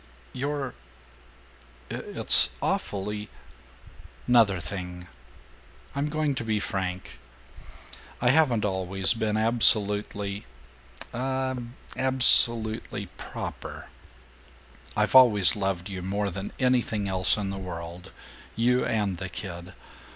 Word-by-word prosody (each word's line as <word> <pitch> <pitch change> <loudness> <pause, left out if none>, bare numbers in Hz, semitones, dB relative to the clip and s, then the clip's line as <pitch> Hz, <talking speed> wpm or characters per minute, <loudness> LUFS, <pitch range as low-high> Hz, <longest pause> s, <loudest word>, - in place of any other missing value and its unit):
"You're 140 0 -4 1.2
It's - - +1
awfully 105 +1 -3 0.5
" - - -23
"'Nother 115 -7 +3
thing. 90 +1 -7 0.9
I'm 140 +2 -2
going 155 -1 -1
to 125 - -5
be 110 -2 -1
frank. 95 - -5 1.0
I 120 0 +3
haven't 130 -8 +2
always 95 0 +2
been 110 -2 -2
absolutely, 105 -3 +3 0.7
uh, 130 +1 -2 0.4
absolutely, 120 -4 +3
proper. - - -8 1.1
I've - - 0
always 110 -8 +7
loved 95 -3 -3
you 95 -2 -7
more 100 +2 -3
than 95 +3 -6
anything 120 -5 0
else 95 +1 +1
in 100 -2 -3
the 95 - -6
world, 90 0 -8 0.4
you 125 +3 +1
and 100 -5 -2
the 95 -1 -6
kid. 90 0 -9
105 Hz, 100 wpm, -26 LUFS, 95-120 Hz, 1.2 s, always